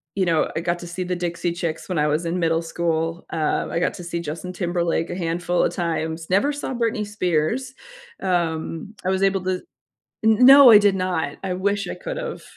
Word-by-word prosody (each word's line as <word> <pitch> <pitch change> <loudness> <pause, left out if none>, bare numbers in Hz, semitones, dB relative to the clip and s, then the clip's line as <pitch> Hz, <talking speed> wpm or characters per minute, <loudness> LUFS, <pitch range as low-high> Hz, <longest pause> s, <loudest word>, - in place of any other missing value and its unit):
you 190 - +1
know, 165 -2 +1
I - - -1
got 175 0 -1
to 175 - -8
see 180 +2 -4
the 180 0 -2
Dixie 175 0 -2
Chicks 165 -2 -4
when 180 - -1
I 150 - +2
was 155 +3 0
in 170 +2 -1
middle 165 -1 +1
school, 165 0 -2
um, 155 -2 -1
I - - -2
got 180 - 0
to 175 - -8
see 170 0 -4
Justin 170 +3 -6
Timberlake 175 -2 -1
a - - -4
handful 175 0 -1
of - - 0
times. 165 -1 -3
Never 240 +10 +3
saw 280 -2 -4
Britney 230 -2 -1
Spears, 205 +6 -1 0.5
um, 170 +1 -2
I 185 - +1
was 190 0 0
able 195 -1 +2
to 185 -1 -1 0.6
N 220 +3 +5
no, 275 -1 +10
I 210 - +10
did 200 -2 +3
not, 175 -6 -2
I 185 -1 -2
wish 200 +2 -1
I - - -5
could - - -6
have. - - -5
175 Hz, 215 wpm, -22 LUFS, 165-195 Hz, 0.6 s, no